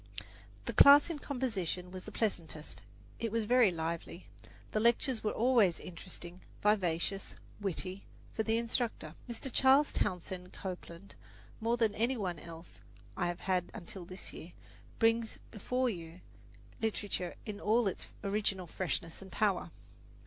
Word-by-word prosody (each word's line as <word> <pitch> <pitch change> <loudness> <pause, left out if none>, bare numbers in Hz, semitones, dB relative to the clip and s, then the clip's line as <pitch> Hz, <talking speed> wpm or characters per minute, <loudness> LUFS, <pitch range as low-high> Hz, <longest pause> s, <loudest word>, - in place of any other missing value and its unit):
The - - -2
class 285 +4 +9
in 310 - -4
composition 200 - -2
was 185 0 -7
the 215 - -7
pleasantest. 170 -8 -2 0.4
It 230 -2 -1
was 230 0 +1
very 240 0 +6
lively. 170 +1 -4 0.5
The 215 - +1
lectures 235 +1 +3
were 215 - +2
always 230 -7 +4
interesting, 175 0 -9 0.2
vivacious, 195 -2 +1 0.2
witty; 190 -1 -3 0.3
for - - 0
the 225 +1 +2
instructor, 230 - -1 0.2
Mr. 240 +3 -4
Charles 270 +3 +6
Townsend 180 0 -2
Copeland, 185 0 -7 0.5
more 230 +2 +1
than 225 -3 +3
any 235 +5 +1
one 180 -6 -2
else 165 +1 -11 0.4
I 175 - 0
have 175 0 -3
had 180 -2 +1
until 180 +1 -7
this 185 +2 -9
year, 170 - -9 0.4
brings 225 0 +3
before 250 +4 0
you 170 -5 -5 0.6
literature 205 -5 -1
in 205 -2 -5
all 220 +1 +3
its 190 - -3 0.2
original 200 -2 0
freshness 165 -1 -3
and 190 -1 -11
power. 195 -4 +1
200 Hz, 140 wpm, -33 LUFS, 180-230 Hz, 0.6 s, class